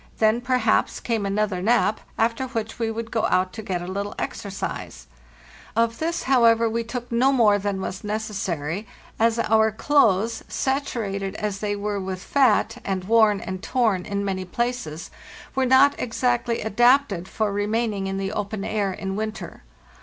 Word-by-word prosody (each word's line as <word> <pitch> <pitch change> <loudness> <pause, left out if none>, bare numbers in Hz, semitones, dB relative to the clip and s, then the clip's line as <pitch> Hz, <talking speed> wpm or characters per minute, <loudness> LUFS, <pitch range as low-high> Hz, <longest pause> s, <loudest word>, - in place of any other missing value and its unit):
Then, 220 +2 +3
perhaps, 245 -3 +1
came 225 -4 -1
another 200 -2 0
nap, 220 0 +2 0.2
after 230 +3 0
which 225 -2 -4
we 225 -1 0
would 225 0 -5
go 225 -1 +1
out 185 0 +1
(to 220 - -6
wet 185 -4 -3
a - - -7
little 200 +2 -4
exercise: 190 - -5 0.7
Of 230 0 +1
this, 335 +1 -1
however, 230 -3 +4
we 230 +1 -1
took 240 +1 -6
no 250 +4 +3
more 215 -6 +4
than 200 -1 -2
was 190 0 -5
necessary, 200 -4 -3 0.3
as 230 +1 +3
our 220 -1 +3
clothes, 225 -3 +2
saturated 220 -8 -2
as 205 -2 -3
they 205 0 -1
were 205 0 -2
with 190 -1 -5
fat, 245 -3 +2
and 190 -2 -2
worn 215 -1 +4
and 185 -1 -5
torn 220 -8 0
in 200 0 -2
many 190 -1 -2
places, 185 -5 -3 0.4
were 265 -1 +1
not 265 +2 +6
exactly 240 0 0
adapted 240 -4 +3
for 210 -1 -1
remaining 205 -1 -1
in 195 0 -3
the 195 0 -2
open 205 -1 -3
air 205 -3 0
in 190 +1 -4
winter. 215 +1 -5
215 Hz, 160 wpm, -24 LUFS, 195-235 Hz, 0.7 s, not